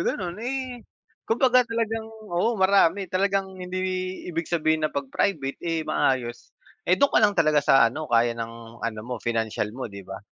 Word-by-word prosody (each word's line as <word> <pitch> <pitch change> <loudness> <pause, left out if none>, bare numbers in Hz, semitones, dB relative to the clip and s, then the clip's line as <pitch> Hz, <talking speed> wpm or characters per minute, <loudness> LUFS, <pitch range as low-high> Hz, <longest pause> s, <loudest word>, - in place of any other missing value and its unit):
gano'n, 180 -2 -2
eh, 255 0 -4 0.5
kumbaga 250 +2 +4
talagang, 225 -1 -2 0.2
oo, 210 +7 +1
marami 190 -1 +3
talagang 195 0 0
hindi 180 0 -4 0.5
ibig 165 0 -3
sabihin 155 -2 +1
na - - -7
'pag 140 -2 -3
private, 140 -9 0
eh, 165 -2 -1
maayos, 125 -5 -1 0.3
eh, 185 - +5
do'n 280 - +4
ka - - +5
lang 205 -1 +4
talaga 155 -2 +4
sa 125 -4 +6
ano 155 +4 -5
kaya 120 0 +4
ng 115 0 -8
ano 110 -2 -3
mo 125 -2 -4
financial 110 -2 -1
mo, 130 - -4
'di 100 0 -9
ba? 95 - -7
165 Hz, 175 wpm, -25 LUFS, 120-200 Hz, 0.5 s, sa